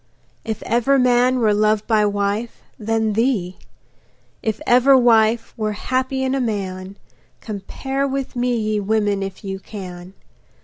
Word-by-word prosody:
If 220 Hz, -2 st, -4 dB
ever 240 Hz, +4 st, +2 dB
man 250 Hz, 0 st, +3 dB
were 220 Hz, -4 st, +3 dB
loved 215 Hz, 0 st, +2 dB
by 215 Hz, -2 st, +3 dB
wife, 205 Hz, +3 st, -2 dB, 0.2 s
then 220 Hz, 0 st, 0 dB
thee; 210 Hz, -6 st, 0 dB, 0.8 s
If 220 Hz, -1 st, -2 dB
ever 255 Hz, +3 st, +5 dB
wife 225 Hz, -2 st, +3 dB
were 215 Hz, -2 st, -2 dB
happy 260 Hz, +4 st, -2 dB
in 260 Hz, 0 st, 0 dB
a 270 Hz, -, 0 dB
man, 195 Hz, -4 st, -4 dB, 0.4 s
Compare 265 Hz, +6 st, -4 dB
with 270 Hz, -1 st, -4 dB
me, 245 Hz, 0 st, 0 dB
ye 215 Hz, -1 st, -1 dB
women, 205 Hz, -1 st, 0 dB
if 195 Hz, +2 st, -6 dB
you 195 Hz, -1 st, -5 dB
can. 185 Hz, -2 st, -9 dB
220 Hz, 140 wpm, -20 LUFS, 205-245 Hz, 0.8 s, ever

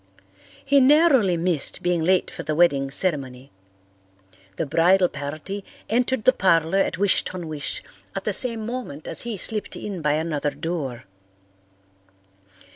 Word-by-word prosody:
He 280 Hz, 0 st, +4 dB
narrowly 265 Hz, -, +4 dB
missed 165 Hz, -4 st, -1 dB
being 175 Hz, -2 st, +1 dB
late 185 Hz, +3 st, +2 dB
for -, -, -7 dB
the 155 Hz, +1 st, -3 dB
wedding 145 Hz, -5 st, +3 dB
ceremony. 135 Hz, -5 st, -1 dB, 1.0 s
The 165 Hz, -, -2 dB
bridal 175 Hz, +5 st, +3 dB
party 155 Hz, +8 st, -6 dB, 0.3 s
entered 245 Hz, +1 st, 0 dB
the 255 Hz, -, +5 dB
parlour 170 Hz, -2 st, +2 dB
at 195 Hz, -, 0 dB
Wish 200 Hz, +1 st, +2 dB
ton 180 Hz, -3 st, -6 dB
wish 150 Hz, -2 st, -5 dB, 0.3 s
at -, -, -3 dB
the -, -, -1 dB
same 230 Hz, -4 st, 0 dB
moment 235 Hz, -, -6 dB
as -, -, -1 dB
he 235 Hz, -3 st, -4 dB
slipped 210 Hz, +3 st, +1 dB
in 195 Hz, -5 st, -6 dB
by 150 Hz, -1 st, +1 dB
another 155 Hz, -2 st, -1 dB
door. 140 Hz, -7 st, -5 dB
175 Hz, 140 wpm, -23 LUFS, 150-210 Hz, 1.0 s, the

